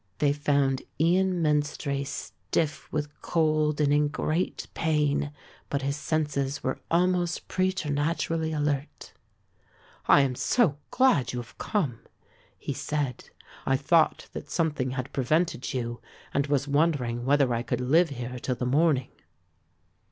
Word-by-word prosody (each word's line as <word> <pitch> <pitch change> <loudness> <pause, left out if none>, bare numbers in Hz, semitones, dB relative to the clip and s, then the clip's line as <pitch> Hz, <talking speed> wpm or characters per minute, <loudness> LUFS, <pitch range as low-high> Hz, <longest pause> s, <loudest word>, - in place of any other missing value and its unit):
They 145 +2 +3
found 140 -2 +1 0.2
Ian 180 +2 +2
Menstrie 145 -2 0
stiff 150 +2 -3
with 150 -1 -4
cold 155 -2 +1
and 145 -1 +3
in 150 0 +3
great 155 +4 -2
pain, 150 -2 +1 0.4
but 140 -1 -1
his 140 +1 0
senses 145 -3 -1 0.3
almost 175 0 +1
preternaturally 165 -2 0
alert. 145 -1 -2 0.9
"I - - +7
am 135 -2 +1
so 155 - +2
glad 255 - +3
you 125 - -2
have 120 -1 -10
come," 145 - -1 0.6
he - - -4
said. 145 -5 -3 0.3
"I 135 - +2
thought 155 +3 +2
that - - -7
something 150 -6 0
had 130 0 -4
prevented 155 +2 0
you 120 -3 -3 0.3
and 140 +1 +1
was 145 -1 +1
wondering 140 -6 +1
whether 135 -1 +3
I 115 - 0
could 120 - -2
live 155 +7 +3
here 125 -2 -5
till 125 +1 -2
the 125 - -3
morning." 135 -1 +2
145 Hz, 130 wpm, -27 LUFS, 135-160 Hz, 0.9 s, I